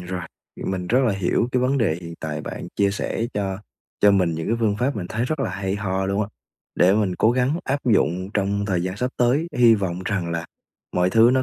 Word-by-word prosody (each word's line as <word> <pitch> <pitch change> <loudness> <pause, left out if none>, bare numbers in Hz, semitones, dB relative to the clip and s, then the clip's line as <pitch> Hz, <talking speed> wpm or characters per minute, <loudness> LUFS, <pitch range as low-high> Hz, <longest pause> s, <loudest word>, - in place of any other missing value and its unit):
rồi, 90 +1 -4 0.4
mình 95 -2 -2
rất 125 +6 +3
là 115 - +2
hiểu 95 +5 0
cái 125 - +2
vấn 135 +2 +2
đề 100 -10 +2
hiện 85 -1 -8
tại, 80 -1 -3
bạn - - -6
chia 100 -1 +3
sẻ 115 +3 -2
cho 95 -2 -2 0.4
cho 105 - +6
mình 90 -4 +3
những 80 - -4
cái 115 - +1
phương 105 -2 +2
pháp 125 +2 0
mình 90 - -4
thấy 115 +2 -1
rất 155 +2 -2
là 135 - -1
hay 95 +1 -2
ho 95 -1 -1
luôn 100 +1 0
á, - - -2 0.5
để 90 +2 +5
mình 100 -4 +1
cố 110 - +4
gắng 130 +6 +1
áp 140 +2 0
dụng 95 -5 +2
trong 100 0 0
thời 95 -4 0
gian 95 +2 -3
sắp 125 +3 -1
tới. 130 +7 +2
Hy 120 -2 +7
vọng 95 -3 -2
rằng 90 -4 -1
là 85 0 -3 0.5
mọi 90 +1 +2
thứ 115 +2 +6
nó 130 0 +3
100 Hz, 240 wpm, -23 LUFS, 95-120 Hz, 0.5 s, Hy